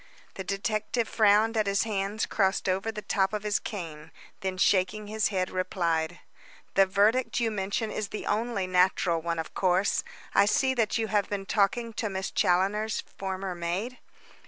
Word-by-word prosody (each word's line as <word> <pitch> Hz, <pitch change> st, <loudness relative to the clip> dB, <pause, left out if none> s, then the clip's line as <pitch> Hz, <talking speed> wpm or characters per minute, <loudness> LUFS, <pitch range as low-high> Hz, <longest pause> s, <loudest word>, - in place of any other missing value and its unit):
The 190 Hz, -, -6 dB
detective 215 Hz, +4 st, -1 dB
frowned 215 Hz, +1 st, +4 dB
at 215 Hz, -2 st, +1 dB
his 200 Hz, 0 st, +2 dB
hands 205 Hz, 0 st, -1 dB
crossed 195 Hz, -2 st, 0 dB
over 190 Hz, +4 st, 0 dB
the 210 Hz, -1 st, -7 dB
top 195 Hz, +1 st, +1 dB
of 210 Hz, -1 st, -2 dB
his 210 Hz, -1 st, +1 dB
cane, 165 Hz, -7 st, -7 dB, 0.3 s
then 190 Hz, -1 st, -3 dB
shaking 195 Hz, +2 st, +2 dB
his 215 Hz, +1 st, 0 dB
head, 185 Hz, -2 st, -1 dB
replied: 170 Hz, -2 st, -1 dB, 0.5 s
"The 195 Hz, 0 st, +5 dB
verdict 210 Hz, +8 st, +2 dB
you 230 Hz, -2 st, +1 dB
mention 205 Hz, +2 st, -2 dB
is 215 Hz, -, -3 dB
the 210 Hz, -, -6 dB
only 215 Hz, -2 st, 0 dB
natural 180 Hz, -2 st, +2 dB
one, 170 Hz, 0 st, -2 dB
of 160 Hz, -, -5 dB
course. 185 Hz, +1 st, +2 dB, 0.3 s
I 200 Hz, -, +5 dB
see 260 Hz, +5 st, +2 dB
that 230 Hz, -3 st, +1 dB
you 220 Hz, -1 st, -1 dB
have 205 Hz, -1 st, +1 dB
been 200 Hz, -1 st, -3 dB
talking 225 Hz, +4 st, +1 dB
with -, -, -3 dB
Miss 190 Hz, 0 st, -3 dB
Challoner's 200 Hz, +4 st, +1 dB
former 190 Hz, -1 st, -4 dB
maid?" 180 Hz, +9 st, -3 dB
200 Hz, 170 wpm, -28 LUFS, 185-215 Hz, 0.5 s, The